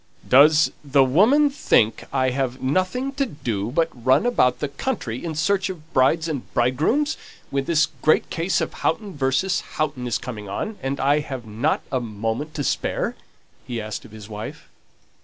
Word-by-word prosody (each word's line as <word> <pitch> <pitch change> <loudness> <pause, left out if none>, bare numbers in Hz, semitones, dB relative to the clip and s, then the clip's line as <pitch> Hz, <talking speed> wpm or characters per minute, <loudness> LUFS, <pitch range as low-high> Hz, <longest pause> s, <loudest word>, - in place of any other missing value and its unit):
"Does 150 +4 +6
the 140 -1 +4
woman 225 - +4
think 115 - +2
I 130 -1 +1
have 130 -1 -2
nothing 185 - 0
to 275 0 -1
do 115 - -3
but 165 +5 +1
run 130 - +2
about 125 - +3
the 145 - -2
country 140 - -4
in 165 -2 -4
search 190 +5 +1
of 165 -3 -9
brides 150 +5 +3
and 145 -6 -5
bridegrooms, 160 - +1 0.3
when 135 0 -1
this 165 -1 +3 0.2
great 155 - +3
case 175 +3 0
of - - -3
Houghton 205 -3 -2
v. 135 -2 +1 0.5
Houghton 140 -5 -2
is 120 - 0
coming 110 -5 -7
on, 210 - -4
and 135 +1 -3
I 145 +2 +3
haven't 130 -1 -2
a 130 - +1
moment 115 +6 -4
to 145 - -2
spare?" - - -1 0.5
he 120 -2 -3
asked 110 -1 -5
of 120 - -13
his 110 -2 -10
wife. 105 0 -8
140 Hz, 170 wpm, -23 LUFS, 125-165 Hz, 0.5 s, Does